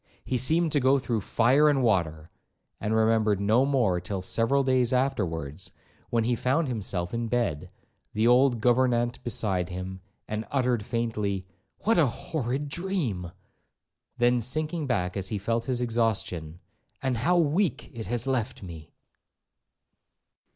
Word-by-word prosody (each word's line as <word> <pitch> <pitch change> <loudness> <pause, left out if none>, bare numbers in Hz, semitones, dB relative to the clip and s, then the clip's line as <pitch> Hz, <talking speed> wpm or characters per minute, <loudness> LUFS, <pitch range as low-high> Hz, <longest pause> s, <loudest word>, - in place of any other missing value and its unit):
'He 130 - -2
seemed 160 +7 +2
to 145 - +2
go 135 +1 +4
through 120 -4 -2
fire 130 +9 +3
and 135 -3 +2
water,' 80 -8 0 0.5
and 110 +1 -1
remembered 110 -2 +2
no 110 +7 +3
more 115 -11 +1
till 95 +2 -4
several 115 +8 +2
days 130 -2 +2
afterwards, 95 - -1 0.4
when 115 -1 +1
he 120 +2 +1
found 130 +7 +1
himself 95 -7 -3
in 115 0 -2
bed, 115 -11 -1 0.4
the 110 +2 +1
old 125 -1 +4
gouvernante 120 0 +2
beside 95 -6 0
him, 95 +1 -6 0.3
and 110 +1 -4
uttered 125 -5 +1
faintly, 105 -5 -2 0.4
'What 220 -4 +3
a 155 - +5
horrid 135 +2 -3
dream!' 145 - -2 0.9
then 120 0 +3
sinking 155 +5 -2
back 90 -8 -1
as 95 -1 -2
he 105 - -3
felt 115 +3 -1
his 125 -2 -1
exhaustion, 110 -9 -1 0.4
'and 130 -2 -1
how 175 +10 +2
weak 160 -1 +1
it 115 -5 -6
has 120 +2 -2
left 130 -4 -2
me!' 80 -4 -10
120 Hz, 145 wpm, -27 LUFS, 100-130 Hz, 0.9 s, a